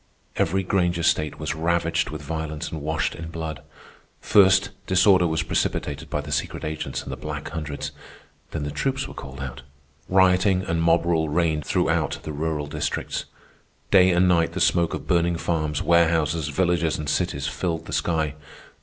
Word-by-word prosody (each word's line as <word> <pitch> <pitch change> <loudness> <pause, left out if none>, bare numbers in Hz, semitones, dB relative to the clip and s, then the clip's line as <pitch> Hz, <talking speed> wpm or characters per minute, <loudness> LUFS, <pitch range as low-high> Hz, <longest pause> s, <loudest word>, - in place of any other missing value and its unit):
Every 95 +3 +1
Granger 90 -2 +1
state 75 -3 +1
was 75 0 -3
ravaged 85 +1 0
with 75 -1 -7
violence 80 0 -4
and 80 - -5
washed 80 +2 -1
in 80 0 -7
blood. 80 -2 -5 0.6
First, 95 0 +4 0.2
disorder 95 -1 +5
was 80 0 0
precipitated 70 -1 -2
by 75 - -1
the 75 0 -8
secret 70 - -2
agents 75 0 -4
and - - -7
the - - -3
Black 75 +3 -6
Hundreds, 75 -4 -5 0.6
then 75 - -4
the 75 - -3
troops 135 - -1
were - - -9
called 65 0 -9
out. 65 -1 -6 0.5
Rioting 95 0 +4
and 85 -2 -1
mob 85 0 +3
rule 80 -2 +1
reigned 80 -1 +1
throughout - - +1
the 75 - -5
rural 75 0 -2
districts. 75 +1 -3 0.7
Day 95 -2 +7
and 90 +1 +4
night 85 -2 +3
the 95 - -3
smoke 85 -2 +2
of - - -7
burning 85 -1 +2
farms, 75 -3 -1
warehouses, 80 -2 +2
villages, 85 0 +1
and 75 - -5
cities 75 -2 -1
filled 80 +1 -2
the - - -7
sky. 80 -4 0
80 Hz, 170 wpm, -24 LUFS, 75-90 Hz, 0.7 s, Day